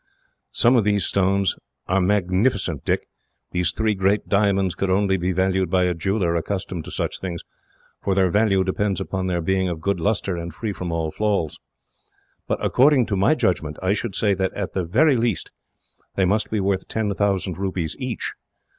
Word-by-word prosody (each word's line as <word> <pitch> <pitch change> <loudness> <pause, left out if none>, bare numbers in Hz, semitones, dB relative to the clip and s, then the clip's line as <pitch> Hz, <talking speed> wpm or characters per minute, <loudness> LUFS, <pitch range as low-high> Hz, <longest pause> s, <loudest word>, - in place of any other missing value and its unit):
"Some 120 +2 +4
of 115 - +3
these 100 -1 +1
stones 95 -1 +2 0.3
are 95 +1 +1
magnificent, 95 - +1
Dick. - - -1 0.5
Those 90 -2 +2
three 110 +2 0
great 100 +1 +1
diamonds 100 -3 +2
could 95 - -2
only 95 +1 +2
be 90 0 -1
valued 95 0 +1
by 90 +1 +2
a 90 0 +1
jeweller 90 +1 0
accustomed 90 -1 -3
to - - -8
such - - -3
things, 85 -3 -5 0.6
for 95 - 0
their 95 -2 +3
value 100 -2 +3
depends 95 +1 -1
upon 95 -1 -3
their 90 -2 0
being 95 +2 +1
of 85 -2 -4
good 100 +3 -1
lustre, 100 -1 0
and 85 -1 -6
free 105 +1 -3
from 90 -2 -5
all 80 -1 -1
flaws; 100 -7 -1 0.9
but, - - 0
according 135 -1 +4
to 100 - -2
my 100 +11 +3
judgment, 80 - -1
I 95 +1 +2
should 105 -2 -3
say 105 -1 +2
that, 95 0 -1
at 100 -3 -4
the 95 -2 -1
very 130 - +3
least, 115 -4 -1 0.6
they 95 - +2
must 105 +4 +1
be 110 - -1
worth 95 -1 0
ten 110 -2 -1
thousand 95 -3 -1
rupees 95 -5 -2
each. 125 -4 -3
95 Hz, 185 wpm, -23 LUFS, 90-105 Hz, 0.9 s, Some